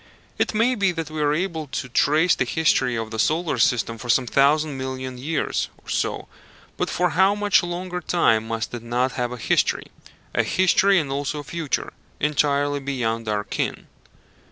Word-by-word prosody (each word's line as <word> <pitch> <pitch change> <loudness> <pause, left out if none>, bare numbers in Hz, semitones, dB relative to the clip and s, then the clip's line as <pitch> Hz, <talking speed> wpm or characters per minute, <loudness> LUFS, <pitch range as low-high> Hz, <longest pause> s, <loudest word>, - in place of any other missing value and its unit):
It - - 0
may 230 +4 +3
be 200 -5 +1
that 165 -2 -5
we 155 -1 -3
are 145 -1 +2
able 160 -1 -2
to 130 0 -4
trace 155 +7 +3
the - - +1
history 130 -2 +1
of 115 -1 -4
the 110 - -4
solar 155 0 +1
system 115 0 +1
for 120 - -8
some 125 +2 +3
thousand 145 +4 +2
million 130 -1 -5
years 155 +4 -1
or - - -27
so; - - -2 0.5
but - - -2
for 180 -1 +1
how 190 +4 +4
much 205 -1 +3
longer 180 +1 -4
time 115 -13 +2
must 115 0 -3
it 120 - -5
not 120 +3 0
have 125 -1 -2
a 125 - -5
history 115 - 0 0.4
a - - +3
history, 190 +1 +3
and 150 -5 0
also 140 +2 -2
a - - -12
future 155 0 -3 0.3
entirely 145 -1 +1
beyond 115 -5 -2
our 105 -1 0
ken? - - -3
145 Hz, 180 wpm, -23 LUFS, 125-170 Hz, 0.5 s, how